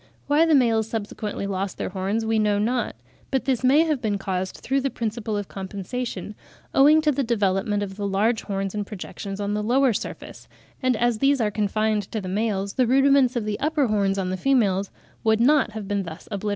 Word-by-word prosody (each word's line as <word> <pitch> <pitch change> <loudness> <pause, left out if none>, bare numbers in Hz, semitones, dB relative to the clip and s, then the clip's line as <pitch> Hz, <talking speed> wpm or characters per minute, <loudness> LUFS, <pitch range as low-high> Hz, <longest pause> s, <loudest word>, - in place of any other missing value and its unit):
Why 300 +3 +3
the 320 - +5
males 225 -4 +3
subsequently 210 -2 -4
lost 195 -1 -3
their - - -3
horns, 195 +4 -2
we 220 0 +1
know 210 -1 +2
not; 235 +3 -1 0.3
but 265 -2 -1
this 260 -2 0
may 270 +5 +5
have 305 -6 -1
been 210 -3 0
caused 190 -1 -3
through 270 +1 -1
the 275 - 0
principle 220 -3 -3
of 205 -2 -4
compensation, 200 +2 -5 0.4
owing 300 +3 +6
to 305 - +3
the 280 - -1
development 205 -2 0
of 195 -1 -7
the 205 -1 -2
large 215 +4 +1
horns 195 -1 -3
and 210 -1 -2
projections 200 0 -7
on 205 0 -2
the 210 - -1
lower 250 +3 +3
surface; - - -7 0.3
and 255 -1 +2
as 240 -1 +1
these 275 +2 +3
are 215 -3 +1
confined 210 0 0
to 220 - -2
the 190 - -6
males, 200 0 -1
the 255 -2 +2
rudiments 270 0 +4
of 235 -3 -1
the 210 -1 -2
upper 305 -1 +1
horns 200 -3 +1
on 185 -1 -1
the 185 - -2
females 200 -5 +2 0.3
would 220 -1 +3
not 260 -2 +3
have 215 -2 -6
been 205 0 0
thus 165 -2 -9
obliterated. 205 0 -2
215 Hz, 210 wpm, -24 LUFS, 200-250 Hz, 0.4 s, owing